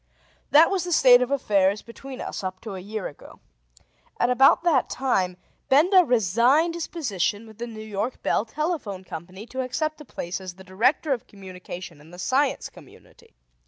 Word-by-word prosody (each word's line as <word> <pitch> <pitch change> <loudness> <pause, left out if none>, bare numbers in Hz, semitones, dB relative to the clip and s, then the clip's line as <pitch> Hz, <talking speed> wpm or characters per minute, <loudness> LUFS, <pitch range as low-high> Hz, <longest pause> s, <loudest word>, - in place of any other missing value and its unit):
That 315 +5 +6
was 380 -3 0
the 355 - -5
state 250 -6 +7
of 250 - 0
affairs 205 -7 +1
between 260 +3 -10
us - - -5
up 185 0 -4
to 220 -3 -7
a 190 - -6
year 205 +2 -5
ago. 145 - -14 0.8
At 245 - +2
about 270 +6 +5
that 320 -7 +2
time 190 -9 0 0.3
Benda 360 +7 +6
resigned 245 - +3
his 340 -1 -4
position 210 - -2
with 220 -1 -15
the 240 - -4
New 220 -2 -9
York 215 +4 -4
Bell - - +1
Telephone 235 - -3
Company 185 +4 -9
to 260 +2 -4
accept 310 +4 -3
a - - -11
place 175 -4 -5
as 185 -2 -8
the 190 - -13
Director 245 - +1
of 245 - -6
Communication 180 -4 -10
in 155 - -17
the 175 - -12
Science 265 +9 0
Community. - - -18
230 Hz, 180 wpm, -24 LUFS, 190-275 Hz, 0.8 s, state